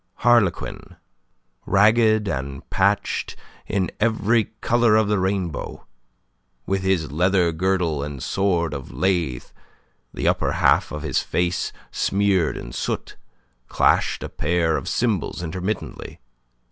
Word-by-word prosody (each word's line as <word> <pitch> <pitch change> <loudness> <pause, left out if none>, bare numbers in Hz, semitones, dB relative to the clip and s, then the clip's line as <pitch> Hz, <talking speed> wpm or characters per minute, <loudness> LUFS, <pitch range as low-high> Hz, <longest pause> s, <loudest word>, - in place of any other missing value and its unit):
Harlequin, 120 -7 +1 0.7
ragged 110 +1 +4
and 70 -4 -4
patched 100 +1 0 0.3
in 95 -2 -1
every 115 0 +2 0.2
colour 120 -2 +3
of 110 -1 +3
the 105 -1 +1
rainbow, 95 -4 -3 0.8
with 95 0 -1
his 95 -6 0
leather 90 +2 +2
girdle 85 -3 0
and 70 -2 -6
sword 85 -5 0
of 70 -3 -7
lath, 85 -10 -1 0.6
the - - -3
upper - - +1
half - - +3
of 75 0 -5
his 80 - 0
face 90 0 -1 0.2
smeared 95 -5 +1
in - - -8
soot, - - -3 0.5
clashed - - +2
a - - -5
pair 85 -2 0
of - - -4
cymbals 105 -7 -1
intermittently. 90 +5 -5
95 Hz, 120 wpm, -22 LUFS, 80-105 Hz, 0.8 s, ragged